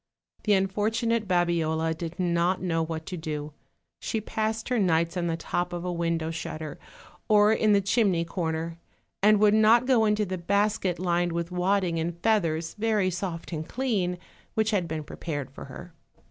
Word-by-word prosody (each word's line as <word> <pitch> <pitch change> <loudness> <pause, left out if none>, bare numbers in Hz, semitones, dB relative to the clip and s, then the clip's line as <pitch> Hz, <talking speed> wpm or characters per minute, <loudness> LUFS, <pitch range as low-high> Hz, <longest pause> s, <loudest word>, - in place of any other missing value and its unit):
The 210 - +4
unfortunate 215 +3 +1
Babiola 165 -3 +1
did 170 +2 -6
not 175 +1 +1
know 165 -3 0
what 160 0 -5
to 185 - -5
do; 150 -2 -5 0.5
she 220 - -2
passed 220 +2 -2
her 250 -2 +1
nights 170 -2 +2
on 175 -1 -1
the 165 -1 -1
top 175 +1 -2
of 175 0 -4
a 180 - -1
window 165 -1 -1
shutter, 155 -2 -6 0.5
or 210 0 +5
in 215 -1 +3
the 200 - +4
chimney 195 -4 +2
corner, 165 -1 -3 0.4
and 210 +1 +5
would 210 0 +5
not 220 +3 +5
go 250 -4 +4
into 210 0 +2
the 185 -1 -4
basket 200 0 +1
lined 175 -1 0
with 170 +1 -3
wadding 180 -1 +1
and 165 +1 -2
feathers, 165 -7 +1
very 210 -4 +2
soft 175 -1 -4
and 155 0 -4
clean, 205 -9 -1 0.4
which 220 0 +2
had 190 -5 +1
been 160 -1 -4
prepared 145 -3 -5
for - - -9
her. - - -10
180 Hz, 175 wpm, -27 LUFS, 165-210 Hz, 0.5 s, or